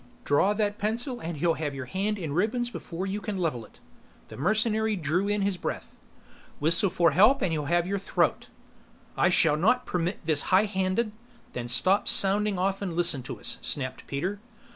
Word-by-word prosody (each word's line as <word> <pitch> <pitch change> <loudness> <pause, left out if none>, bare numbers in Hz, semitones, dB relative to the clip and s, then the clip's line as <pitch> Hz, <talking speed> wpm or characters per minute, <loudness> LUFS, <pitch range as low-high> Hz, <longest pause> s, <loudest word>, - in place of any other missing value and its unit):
"Draw 165 +8 +3
that 210 -1 -1
pencil 240 +4 -2
and 165 -1 -5
he'll 165 +3 +2
have 150 -3 -4
your 130 -1 -5
hand 200 +9 -2
in 160 -7 -4
ribbons 230 +8 0
before 180 -4 -6
you 200 +2 -3
can 205 -1 -4
level 155 -10 -2
it." - - -21 0.5
The - - -9
mercenary 215 - +1
drew 175 +3 -1
in 205 -1 0
his 195 -2 0
breath. - - -5 0.6
"Whistle 165 +6 +2
for 170 -1 +2
help 225 +10 +4
and 180 - +1
he'll 150 -2 -2
have 175 +3 +1
your 200 +2 -2
throat." 195 - 0 0.7
"I 175 - +3
shall 160 -4 +4
not 245 +10 +2
permit 175 0 -3
this 155 -3 0
high 195 +3 +5
handed 190 +2 -1 0.2
" 240 - -29
"Then 120 -1 -4
stop 185 - +2
sounding 200 +1 +3
off 195 +2 -1
and 180 -4 -4
listen 170 -6 +4
to 125 - -7
us!" - - -3
snapped 130 -3 -3
Peter. 185 +9 -3
185 Hz, 190 wpm, -27 LUFS, 160-210 Hz, 0.7 s, high